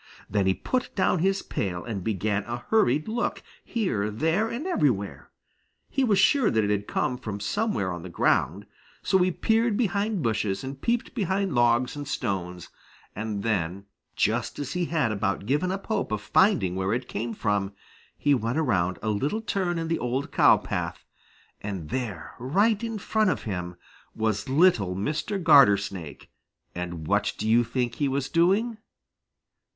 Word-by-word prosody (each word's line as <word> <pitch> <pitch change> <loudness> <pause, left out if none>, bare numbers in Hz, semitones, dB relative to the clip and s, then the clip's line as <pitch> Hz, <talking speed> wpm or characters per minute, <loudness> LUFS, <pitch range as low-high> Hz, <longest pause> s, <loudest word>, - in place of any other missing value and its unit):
Then 100 -2 +1
he 95 - +3
put 255 -1 -2
down 185 -2 +2
his 195 +3 +1
pail 90 -3 -3
and 105 -6 -4
began 100 0 -1
a 120 0 -5
hurried 155 - +3
look 235 +2 -2 0.2
here, 180 - -1
there, 160 - 0
and 245 +8 -4
everywhere. 125 - 0 0.6
He 270 - +1
was 215 -6 +3
sure 245 +5 +4
that 110 -1 +2
it 105 - 0
had 105 0 -1
come 125 -1 -1
from 105 -5 -5
somewhere 105 - -1
on 85 - -6
the 90 - -8
ground, - - +1 0.4
so 190 - +3
he 180 0 +3
peered 225 +4 +1
behind 205 -4 0
bushes 105 -3 -1
and 135 +1 -7
peeped 235 0 -1
behind 195 - -1
logs 120 +1 +2
and 145 -1 -6
stones, 90 -6 -3 0.5
and 105 -1 -3
then 100 -3 -1 0.3
just - - 0
as 140 -2 -4
he 180 -1 0
had 155 -9 0
about 100 -1 -1
given 150 - +1
up 195 +1 -4
hope 220 - -1
of 110 - 0
finding 160 - +2
where 95 +2 0
it 125 0 -4
came 115 +2 -4
from, 100 -2 0 0.5
he 145 - +2
went 120 +1 0
around 95 - +1
a 110 - 0
little 140 - 0
turn 185 -5 -1
in 165 0 -2
the 165 - 0
old 125 +3 -2
cow - - +6
path, - - -4 0.6
and 95 -7 -5
there 110 -11 -4
right 200 - +2
in 225 -1 -3
front 215 +1 +1
of - - -1
him 90 -4 -4 0.4
was 110 +1 -1
little 130 - +3
Mr. 155 - -2
Gartersnake, 100 - +3 0.4
and 85 -2 -5
what 100 +4 +1
do 110 - -3
you 115 +2 +5
think 120 0 -2
he 145 - 0
was 135 0 -1
doing? 205 +7 +2
125 Hz, 170 wpm, -26 LUFS, -, 0.6 s, cow